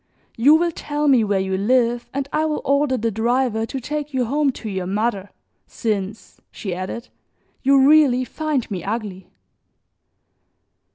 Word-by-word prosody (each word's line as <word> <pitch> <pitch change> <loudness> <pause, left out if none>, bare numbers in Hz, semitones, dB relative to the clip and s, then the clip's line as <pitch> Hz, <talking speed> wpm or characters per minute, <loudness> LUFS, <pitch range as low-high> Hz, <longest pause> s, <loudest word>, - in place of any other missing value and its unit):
You 280 +7 +6
will 340 +1 +2
tell 295 -1 -3
me 260 -5 +5
where 200 -2 +1
you 190 0 -1
live 240 +3 +1
and 275 0 -3
I 310 - +1
will 305 -1 -2
order 280 -1 +2
the 230 0 -1
driver 225 +1 0
to 270 - -4
take 295 +2 -5
you 255 -2 +1
home 285 +3 +1
to 225 - -8
your 190 -3 -3
mother, 205 0 -1 0.4
since," 210 -2 -4
she 195 -4 -5
added, 185 +7 -6 0.5
"you 275 0 +5
really 280 -5 +5
find 300 -5 -3
me 180 -4 -4
ugly." 200 -3 -5
240 Hz, 155 wpm, -21 LUFS, 210-280 Hz, 0.5 s, You